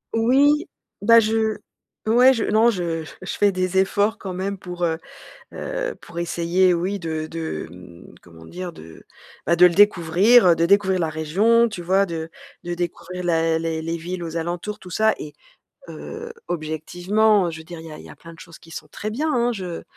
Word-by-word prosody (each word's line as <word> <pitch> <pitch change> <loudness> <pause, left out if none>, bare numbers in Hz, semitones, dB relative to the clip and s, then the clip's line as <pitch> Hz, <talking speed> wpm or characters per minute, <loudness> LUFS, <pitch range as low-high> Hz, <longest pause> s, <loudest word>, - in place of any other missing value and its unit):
Oui, 280 +7 +3 0.3
bah, 230 +3 +7
je, 220 0 0 0.5
ouais, 245 +4 +6
je 230 - -2
non, 220 +2 +3
je 170 -6 -2 0.2
je - - -5
fais 205 -1 +3
des 185 0 0
efforts 205 +3 +1
quand 190 - -6
même 190 +2 -4
pour, 180 -1 -6
heu 160 -1 -1 0.5
heu, - - -4
pour 170 - -10
essayer, 175 +2 +1
oui, 185 +4 -2
de 160 -3 -4
de, 160 - -5
hem, 90 0 -14
comment 80 -2 -16
dire? 180 - -7
De, 80 - -14 0.4
bah, 170 - +3
de 180 +1 +7
le 175 - +2
découvrir, 200 +3 +5
heu, 170 - +5
de 165 - +2
découvrir 190 0 +3
la 165 -3 -1
région, 200 +10 +2
tu 215 -5 -7
vois? 190 +3 +2
De 165 -2 -5 0.4
de 175 0 -3
découvrir 180 +1 -5
la 165 -2 +1
les 165 -1 -2
les 165 +1 -3
villes 175 +2 -5
aux 165 0 -6
alentours 175 +5 -4
tout 180 - -12
ça 220 +4 +2
et 150 - -8 0.6
heu, 455 +1 -8 0.2
objectivement, 175 +6 +1
heu, - - -3
je 160 - -8
veux 160 - -11
dire 170 0 -9
il 165 - -11
y 160 - -9
a 155 - -9
il - - -12
y - - -13
a - - -13
plein 165 - -13
de 165 - -16
choses 165 0 -13
qui 165 - -18
sont - - -8
très 215 - -6
bien, 300 +8 -1
hein, 240 0 +1
je 185 -6 -6
180 Hz, 205 wpm, -22 LUFS, 165-215 Hz, 0.6 s, bah